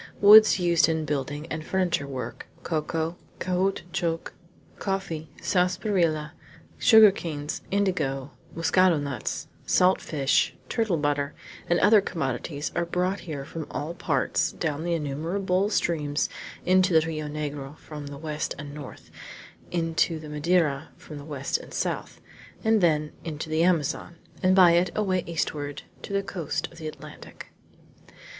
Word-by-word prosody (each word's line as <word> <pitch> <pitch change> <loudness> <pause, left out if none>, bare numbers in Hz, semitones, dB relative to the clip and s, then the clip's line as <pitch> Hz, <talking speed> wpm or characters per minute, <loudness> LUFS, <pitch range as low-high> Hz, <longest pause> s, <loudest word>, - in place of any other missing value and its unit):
Woods 215 0 +8
used 170 -2 +3
in 160 -1 0
building 145 +1 -3
and 155 0 -3
furniture 175 -5 0
work, 130 -2 -6 0.2
cocoa, 160 +1 -2 0.2
caoutchouc, 180 -2 -1 0.5
coffee, 190 -6 -3
sarsaparilla, 180 -4 +1 0.5
sugar 220 -3 +8
canes, 150 -5 -5
indigo, 155 -9 0 0.2
muscado 165 +1 +4
nuts, 140 -6 -4 0.2
salt 185 +1 +4
fish, 140 -3 +1
turtle 220 -7 +1
butter, 145 -1 -1 0.3
and 175 - +3
other 210 0 +6
commodities, 145 -2 -3
are 175 - +1
brought 180 +3 -1
here 140 -3 -4
from 160 0 -6
all 155 +3 -4
parts, - - 0
down 155 -2 -2
the 170 0 0
innumerable 180 +6 -1
streams 150 -7 0 0.4
into 185 -2 +5
the 160 - -2
Rio 155 -2 -3
Negro 145 -1 -5
from 150 -2 -9
the 140 0 -8
west 155 0 -3
and 145 -1 -8
north, 145 -3 -10 0.6
into 165 -1 0
the 155 -1 -9
Madeira 150 -1 +1
from 150 -2 -10
the - - -9
west 140 -3 -2
and - - -12
south, - - -3 0.4
and 220 -2 +3
then 155 -3 +2
into 155 -1 -5
the 155 +1 +2
Amazon, 170 -1 0 0.3
and 185 0 +4
by 180 -3 +8
it 175 +2 +3
away 190 -4 +1
eastward 150 -3 -3 0.2
to - - -8
the 200 0 0
coast 180 -5 -3
of - - -14
the 155 - -5
Atlantic. 155 - -10
165 Hz, 140 wpm, -26 LUFS, 150-180 Hz, 0.6 s, Woods